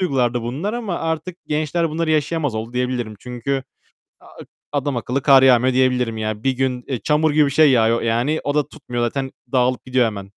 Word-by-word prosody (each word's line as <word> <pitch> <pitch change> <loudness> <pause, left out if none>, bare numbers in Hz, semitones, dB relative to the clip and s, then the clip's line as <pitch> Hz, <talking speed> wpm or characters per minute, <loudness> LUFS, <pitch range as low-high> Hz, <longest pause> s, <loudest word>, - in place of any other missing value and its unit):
duygulardı 125 -8 0
bunlar 145 - -3
ama 225 -7 -3
artık 165 +2 -3
gençler 155 +2 -1
bunları 160 +1 -1
yaşayamaz 150 -3 0
oldu 110 +2 -5
diyebilirim. 125 -3 -2
Çünkü 125 +2 -3 0.6
a - - -19 0.5
adamakıllı 140 -2 -2
kar 135 -2 +6
yağmıyor 130 0 +5
diyebilirim. 125 -3 +1
Yani 110 0 -4
1 135 - +3
gün, 130 -1 -2
eee, 130 -3 -2
çamur 150 +1 +2
gibi 150 0 +4
bir - - -1
şey 150 +1 +5
yağıyor 115 -2 +3
yani, 120 +7 0
o 145 - -1
da 150 -1 +1
tutmuyor 125 -6 -5
zaten. 135 +3 -2 0.2
Dağılıp 125 -1 +1
gidiyor 130 -2 +2
hemen. 100 -3 -5
130 Hz, 185 wpm, -20 LUFS, 120-150 Hz, 0.6 s, kar